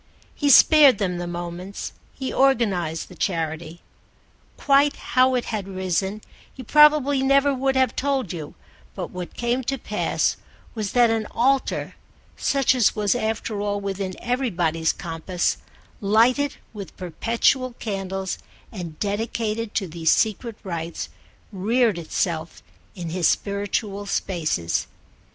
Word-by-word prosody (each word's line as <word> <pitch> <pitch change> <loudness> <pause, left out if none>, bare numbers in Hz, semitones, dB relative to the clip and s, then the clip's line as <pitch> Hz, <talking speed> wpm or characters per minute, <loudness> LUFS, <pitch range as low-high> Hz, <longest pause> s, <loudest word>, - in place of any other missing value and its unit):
He 290 - 0
spared 285 -2 +8
them 180 -3 -1
the 175 - -4
moments, 175 +3 -6 0.2
he 265 -1 -5
organised 200 -12 +1
the - - -13
charity. 165 -1 -3 0.8
Quite 285 +1 +3
how 255 +1 +2
it 245 - -1
had 205 -3 -3
risen 190 +2 -2 0.3
he 260 - -10
probably 295 0 +5
never 275 +1 +3
could 265 +1 0
have 260 -2 +2
told 270 -8 -1
you, 155 -4 -7 0.4
but - - -5
what 180 -1 -7
came 240 +2 -1
to 270 +2 -1
pass 210 -3 -1 0.4
was 215 -3 -4
that 240 -2 +5
an 220 -1 -1
altar, 265 +3 0 0.4
such 275 -2 +2
as 245 -5 +3
was 210 -2 +2
after 220 -2 -2
all 205 0 -1
within 195 -1 -4
everybody's 175 -11 0
compass, 170 +2 -2 0.4
lighted 240 +7 +3 0.2
with 200 -3 -9
perpetual 235 +7 0
candles 195 -4 -4 0.3
and 175 -8 -7
dedicated 220 +1 -2
to 195 - 0
these 165 -1 -1
secret 220 +1 +1
rites, 170 -3 -5 0.4
reared 215 0 +1
itself 165 0 -3 0.3
in 175 -3 -5
his 175 -1 +2
spiritual 200 0 -1
spaces. 155 - -1
205 Hz, 130 wpm, -23 LUFS, 180-255 Hz, 0.8 s, spared